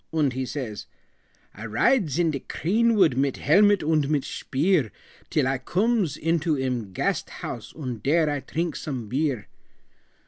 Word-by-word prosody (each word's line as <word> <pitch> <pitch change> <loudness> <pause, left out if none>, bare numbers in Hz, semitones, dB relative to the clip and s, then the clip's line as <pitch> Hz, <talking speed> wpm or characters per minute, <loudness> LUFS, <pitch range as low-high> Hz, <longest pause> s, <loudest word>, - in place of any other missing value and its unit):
Und 150 -5 +1
he 130 0 -3
says, 120 -8 -5 0.7
"I 105 - -10
rides 155 - +2
in 170 -2 +2
de 140 - -3
creenwood 205 - +2
Mit 135 0 0
helmet 205 +6 +4
und 155 -2 +1
mit 150 -3 +1
shpeer, 150 - 0 0.4
Till - - +1
I 135 0 0
cooms 190 - 0
into 165 -1 0
em 125 -6 -2
Gasthuas, - - -3
Und 125 -8 -5
dere 155 +3 +3
I 145 -1 -1
trinks 165 +3 -3
some 130 -7 -4
beer." 135 -1 -1
145 Hz, 145 wpm, -25 LUFS, 130-170 Hz, 0.7 s, helmet